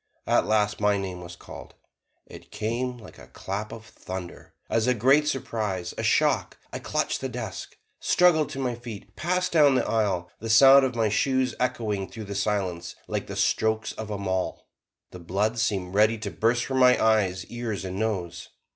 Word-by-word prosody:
At - - +2
last, 105 -1 +1
my 105 -1 +2
name 95 -2 -5
was 85 0 -9
called: - - -12 0.5
it - - -13
came 125 +3 -3
like 110 -2 -14
a - - -13
clap 105 +3 -5
of 110 -1 -9
thunder 95 -4 -9
as 115 +1 0
a 125 - +3
great 135 +7 +4
surprise, 105 -10 -2
a - - -4
shock. - - +1 0.2
I - - -4
clutched - - -2
the - - -3
desk, - - -7 0.2
struggled 165 -4 +3
to - - -7
my 130 -2 -1
feet, 115 -3 -10
passed 180 +2 -1
down 145 -5 +5
the - - +1
aisle, 95 -6 0
the 115 - -6
sound 135 +4 +8
of 125 -2 -3
my 115 -2 +1
shoes 130 +3 +1
echoing 110 -6 -1
through 110 - -8
the 100 - -6
silence 95 -4 -2
like - - -3
the - - -6
strokes 110 0 +1
of 110 -1 -7
a 105 - -3
maul. 95 -2 -3 0.5
The 90 - -10
blood 100 +7 -1
seemed 95 -5 -1
ready 110 +2 +4
to 110 - -5
burst 120 +2 +1
from 130 -1 -1
my 125 -1 +6
eyes, 100 -4 +2
ears 120 -5 -5
and 95 +1 -5
nose. 95 -6 -3
110 Hz, 185 wpm, -26 LUFS, 100-125 Hz, 0.5 s, sound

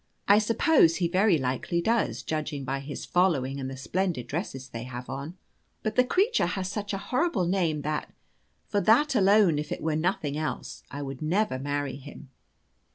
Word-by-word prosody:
I 205 +1 +7
suppose 220 - +4
be 175 - +1
very 185 +1 +3
likely 130 +6 -1
does, 170 - 0
judging 150 -2 -3
by 135 +1 -2
his 140 +1 -6
following 140 -7 +1
and 130 -1 -4
the 135 - -7
splendid 170 -2 -2
dresses 135 - -4
they 115 -3 -7
have 125 0 -7
on. 140 +7 -6 0.5
But 215 0 -2
the 250 - +5
creature 390 - +2
has 185 +1 -3
such 205 0 -4
a 195 - -1
horrible 240 - 0
name 170 -5 0
that, 150 0 -3 0.6
for 205 -2 0
that 270 +8 +4
alone 200 - +4
if 150 - -5
it - - -2
were 160 - +1
for 155 - 0
nothing 155 -4 -1
else, 155 0 -4
I 145 +1 -5
never 155 +10 -1
would 130 - -4
marry 145 -1 -2
him. 145 0 -12
165 Hz, 185 wpm, -27 LUFS, 140-200 Hz, 0.6 s, I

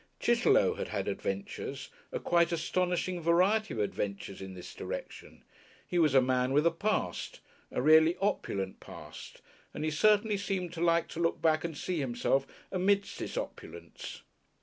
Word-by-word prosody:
Chitterlow - - +4
had - - -2
had - - -3
adventures, 100 0 -4 0.2
a - - -2
quite 170 -1 +2
astonishing 180 +1 -1
variety 185 +7 +3
of - - -4
adventures 100 -1 -3
in 95 -1 -7
this 90 - -9
direction; - - -7 0.4
he 175 - -1
was 155 -5 +4
a 135 - +8
man 130 0 +1
with 150 +3 +3
a 170 - +5
past, 165 - -2 0.3
a - - -2
really 160 +3 +6
opulent 100 - -1
past, - - -11 0.3
and 150 - -3
he 155 - 0
certainly 210 +5 +3
seemed 185 -3 -3
to 165 - -5
like 170 -1 +3
to 165 - -7
look 165 -1 +1
back 160 -1 +2
and 165 -3 -4
see 180 +2 -2
himself 135 +1 0 0.2
amidst 200 +2 +1
its - - -4
opulence. 85 +1 -7
165 Hz, 160 wpm, -31 LUFS, 130-180 Hz, 0.4 s, a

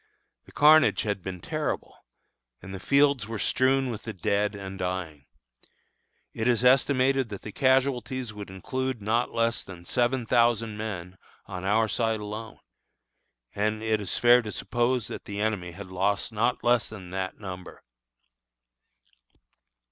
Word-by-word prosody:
The - - -16
carnage 155 +1 +5
had 105 -3 -2
been 90 -1 -6
terrible, - - -3 0.7
and 95 +1 -10
the 95 - -5
fields 140 -4 +3
were 115 0 -4
strewn 130 +3 +2
with 110 - -6
the 110 - -6
dead 100 +2 0
and 95 -1 -7
dying. 90 -6 -4 1.1
It 110 - -2
is 120 -1 +2
estimated 130 0 +3
that 100 -2 -7
the 105 - -7
casualties 130 -1 +1
would 105 -2 -8
include 130 +7 -3
not 110 +4 0
less 115 0 0
than 85 -2 -11
seven 120 +3 +1
thousand 115 -1 +2
men 95 -4 -6 0.3
on 95 -1 -6
our 110 +3 +3
side 110 +1 0
alone; 105 +2 -7 1.0
and 110 +1 -1
it 110 -1 +1
is 95 - -2
fair 120 +1 +6
to 110 -2 -6
suppose 120 0 0
that - - -7
the 100 0 -5
enemy 105 -5 -1
has 100 +3 -8
lost 95 +4 -1
not 115 +3 0
less 120 -1 +3
than 95 -5 -10
that 95 0 -3
number. 95 -3 -9
110 Hz, 150 wpm, -27 LUFS, 95-120 Hz, 1.1 s, fair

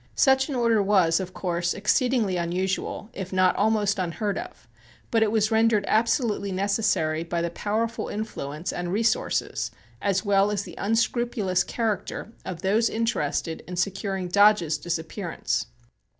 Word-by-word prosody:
Such 265 +1 +4
an 280 - -2
order 230 -3 +3
was, 190 -4 +3
of 185 -1 -5
course, 175 -1 -1
exceedingly 220 -1 +1
unusual, 185 +5 -2
if 190 -1 -6
not 185 -1 +3
almost 205 -2 +1
unheard 190 +3 -2
of, - - -8 0.4
but 225 - +3
it 220 -1 +3
was 215 0 +2
rendered 220 -2 +3
absolutely 220 -3 +1
necessary 185 -5 0
by 170 0 -2
the 170 - -2
powerful 220 +5 -2
influence 170 -6 -4
and 175 0 -3
resources, 230 - 0 0.3
as 200 +1 0
well 200 0 +3
as 205 -1 -1
the - - -10
unscrupulous 225 -3 +1
character, 220 +1 -3
of 175 -3 -6
those 215 +4 +3
interested 165 -8 -1
in 180 - -5
securing 195 +1 -2
Dodge's 180 -5 +4
disappearance. 165 - -3
200 Hz, 140 wpm, -25 LUFS, 175-220 Hz, 0.4 s, Such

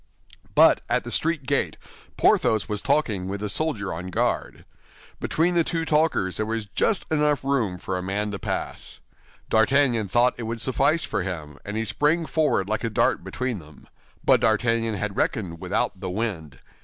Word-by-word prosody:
But - - +6
at - - +1
the - - -7
street 160 -4 0
gate, 140 0 0 0.4
Porthos 110 -2 +3
was 105 -2 -2
talking 105 -11 0
with 100 +1 -4
the 105 0 -3
soldier 110 -7 -1
on 85 +3 -6
guard. 90 - -2 0.5
Between 170 +3 +1
the 170 -1 +4
two 165 0 -2
talkers 150 - +1
there 110 - 0
was 115 -1 -2
just 180 - 0
enough 150 -2 +2
room 125 -10 0
for 95 +1 -4
a 90 - -2
man 105 +3 -2
to 100 - -5
pass. - - -4 0.5
D'Artagnan 115 -1 +3
thought 120 +6 +3
it - - -4
would 115 0 -3
suffice 140 +6 +2
for - - -2
him, 80 -6 -6
and 105 +1 -5
he 110 - -1
sprang 155 +8 +1
forward 150 -12 +1
like 110 +1 -2
a 115 - 0
dart 105 - +1
between 125 -5 -3
them. 75 -3 -16 0.4
But - - +5
D'Artagnan 115 0 +2
had 100 0 -3
reckoned 90 -9 -1
without 95 - -1
the 95 -1 -4
wind. 90 - -3
110 Hz, 180 wpm, -24 LUFS, 95-140 Hz, 0.5 s, But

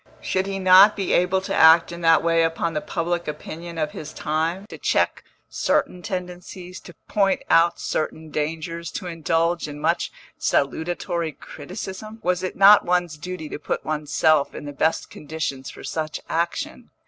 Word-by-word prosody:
Should 190 +1 -1
he 195 0 -3
not 190 +2 +7
be 195 -3 -1
able 180 +2 +2
to 195 +1 -4
act 165 0 +6
in 170 0 -7
that 165 -1 +5
way 165 0 +3
upon 165 0 0
the 150 - -1
public 175 0 -2
opinion 165 +3 -7
of 155 -1 -1
his 155 0 -8
time, 160 +5 -2
to 215 - -11
check - - +1 0.2
certain 180 - 0
tendencies, 180 0 -6
to 175 - -14
point 195 -2 +1
out 170 +1 +4
certain 155 0 -3
dangers, 165 +3 -3
to - - -5
indulge 165 0 0
in 145 0 -8
much - - 0 0.3
salutary 165 +2 -1
criticism? 190 +9 -8
Was 180 0 +1
it 185 - -4
not 200 +1 +8
one's 175 -3 0
duty 160 +1 -6
to - - -6
put - - -3
one's 150 -1 -3
self 155 -3 +3
in - - -7
the 145 - -6
best 160 +3 0
conditions 145 -3 -5
for - - -11
such 155 -1 -3
action? 200 - -3
170 Hz, 170 wpm, -23 LUFS, 155-180 Hz, 0.3 s, not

